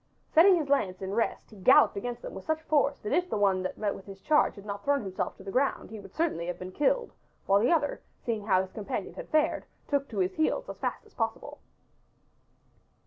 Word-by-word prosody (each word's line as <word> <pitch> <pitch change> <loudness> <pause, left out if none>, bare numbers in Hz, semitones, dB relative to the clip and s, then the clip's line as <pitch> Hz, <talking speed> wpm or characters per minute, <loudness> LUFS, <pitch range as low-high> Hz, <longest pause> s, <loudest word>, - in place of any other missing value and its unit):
Setting 365 +4 +7
his 315 -4 -1
lance 200 -10 +1
in 190 +1 -3
rest 230 +1 -1
he 215 - -13
galloped 185 - +6
against 240 +4 -4
them - - -6
with 190 - -8
such 315 0 -1
force 285 -2 +2
that 210 - -4
if 360 0 +1
the - - -1
one 195 -2 +3
that 185 - -4
met 210 -2 -1
his 195 -1 -10
charge 300 +9 +3
had 200 -1 -12
not 200 -1 -5
thrown 280 -3 +1
himself 190 -1 -3
to - - -12
the 195 - -6
ground 265 +1 0
he 220 - -7
would 195 -1 -13
certainly 310 - -1
have 175 -1 -3
been 185 +1 -7
killed, 480 - +1 0.3
while 195 +1 +4
the 230 - +3
other, 300 -4 +1 0.2
seeing 225 -4 -1
how 185 - +4
his 190 - -10
companion 210 -3 -4
had - - -9
fared, 310 -1 +2 0.2
took 280 -1 0
to 220 - -7
his 185 -1 +1
heels 410 +11 0
as - - -8
fast - - -3
as - - -21
possible. - - -3
220 Hz, 230 wpm, -29 LUFS, 195-300 Hz, 0.3 s, Setting